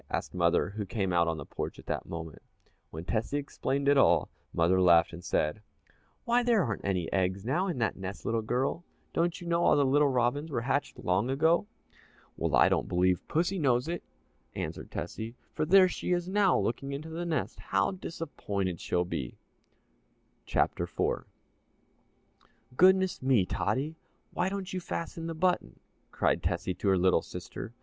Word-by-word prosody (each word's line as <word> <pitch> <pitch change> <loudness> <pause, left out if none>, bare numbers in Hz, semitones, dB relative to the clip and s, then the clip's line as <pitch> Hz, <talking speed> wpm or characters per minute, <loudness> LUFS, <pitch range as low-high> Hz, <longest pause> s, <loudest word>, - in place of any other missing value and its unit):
asked - - -3
mother, - - +2
who 105 +1 -4
came 95 -1 -2
out 85 -1 +3
on 80 -1 -1
the - - -7
porch - - -5
at - - -13
that - - -3
moment. 80 -2 -7 0.5
When 80 +2 -7
Tessie 115 +8 -1
explained 140 -1 -2
it 140 -1 +5
all, - - +4 0.2
mother 90 +3 +3
laughed 85 -2 +5
and 85 +1 -9
said, 75 +7 0 0.6
"Why, 240 +1 +3
there 235 -5 +3
aren't 110 -7 -3
any 90 -4 -1
eggs 95 +1 0
now 170 +10 +1
in 175 -7 -2
that 115 -2 0
nest, 95 +1 -6
little 115 0 0
girl 130 +9 -1 0.3
don't 170 +1 0
you 175 - -9
know 170 0 +1
all - - +5
the 140 - +4
little 145 +2 +4
robins 130 +5 0
were 130 -6 -1
hatched 135 +3 -1
long 105 -1 0
ago?" 160 +8 +2 0.7
"Well, - - 0
I - - +6
don't - - +1
believe 90 0 +1
pussy 175 +4 0
knows 125 -3 +2
it," 170 0 -3 0.5
answered - - -5
Tessie, 115 +2 -5 0.2
"for 155 - -1
there 190 +2 +7
she 180 - -2
is 175 0 -1
now 195 0 +3
looking 135 +4 -2
into 150 +3 -6
the 165 +2 -4
nest 165 -2 -2
how - - +1
disappointed 105 - -4
she'll 90 0 0
be!" 65 -8 -5 1.1
CHAPTER - - +1
IV - - -2 1.5
"Goodness 190 +3 +4
me, 130 -8 +3
Tottie, 150 - -2 0.4
why 180 - 0
don't 195 -1 -5
you 185 - -1
fasten 170 -1 -5
the 165 - -4
button!" 180 +2 0 0.3
cried - - +1
Tessie 85 +2 -1
to 100 - -4
her 95 -1 +4
little 90 -2 +3
sister. 90 +6 -8
130 Hz, 175 wpm, -30 LUFS, -, 1.5 s, there